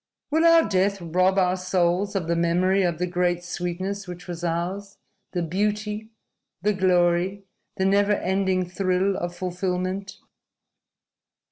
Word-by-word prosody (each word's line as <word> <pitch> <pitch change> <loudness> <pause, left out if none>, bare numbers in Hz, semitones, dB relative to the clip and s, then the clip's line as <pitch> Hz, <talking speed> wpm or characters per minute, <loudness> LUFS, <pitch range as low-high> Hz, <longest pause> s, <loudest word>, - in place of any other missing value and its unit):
Will 320 +2 +3
our 330 -1 +6
death 195 0 +1
rob 185 +3 +1
our 185 -1 +3
souls 185 +2 0
of 180 -4 -1
the 170 - +1
memory 180 +3 +2
of 175 -3 0
the 180 - 0
great 175 0 0
sweetness 180 +3 -4
which 180 0 -8
was 175 -1 -6
ours, 180 +4 -3 0.4
the 175 -2 -1
beauty, 210 +4 -2 0.5
the 210 +1 +3
glory, 185 +1 +2 0.3
the 190 - +1
never 200 +1 +3
ending 190 -1 0
thrill 185 +1 0
of 175 -1 -4
fulfillment?" 185 +1 -3
185 Hz, 135 wpm, -24 LUFS, 175-195 Hz, 0.5 s, our